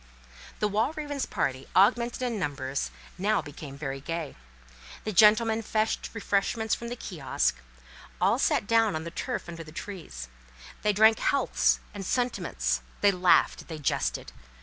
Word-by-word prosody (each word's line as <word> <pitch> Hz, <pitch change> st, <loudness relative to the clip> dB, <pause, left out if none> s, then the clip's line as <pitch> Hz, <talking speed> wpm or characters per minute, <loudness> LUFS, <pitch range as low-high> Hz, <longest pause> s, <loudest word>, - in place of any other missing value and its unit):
The 210 Hz, -, +2 dB
Walravens' 280 Hz, +7 st, -1 dB
party, 130 Hz, 0 st, -2 dB
augmented 235 Hz, +5 st, +3 dB
in 235 Hz, -4 st, -1 dB
numbers, 140 Hz, -5 st, -2 dB, 0.3 s
now 205 Hz, +3 st, +2 dB
became 145 Hz, -1 st, -8 dB
very 135 Hz, -2 st, -4 dB
gay. 165 Hz, -1 st, -4 dB, 0.7 s
The 215 Hz, -, -2 dB
gentlemen 220 Hz, +3 st, +5 dB
fetched 220 Hz, 0 st, -1 dB
refreshments 220 Hz, +1 st, 0 dB
from 235 Hz, -, -3 dB
the 240 Hz, -, -4 dB
kiosk, 160 Hz, -, -1 dB, 0.6 s
all -, -, +3 dB
sat -, -, +2 dB
down 225 Hz, -3 st, +3 dB
on 155 Hz, -, -3 dB
the 170 Hz, -, -6 dB
turf 245 Hz, +6 st, -4 dB
under 165 Hz, -1 st, -7 dB
the 155 Hz, -, -12 dB
trees; 160 Hz, -, -7 dB, 0.5 s
they 210 Hz, -, +3 dB
drank 220 Hz, +2 st, +5 dB
healths 280 Hz, -, +2 dB
and 200 Hz, -2 st, -6 dB
sentiments; 175 Hz, -, -1 dB, 0.2 s
they 205 Hz, -, +6 dB
laughed, 180 Hz, -1 st, +3 dB
they 160 Hz, -, -6 dB
jested. 145 Hz, -, -1 dB
200 Hz, 145 wpm, -28 LUFS, 155-225 Hz, 0.7 s, they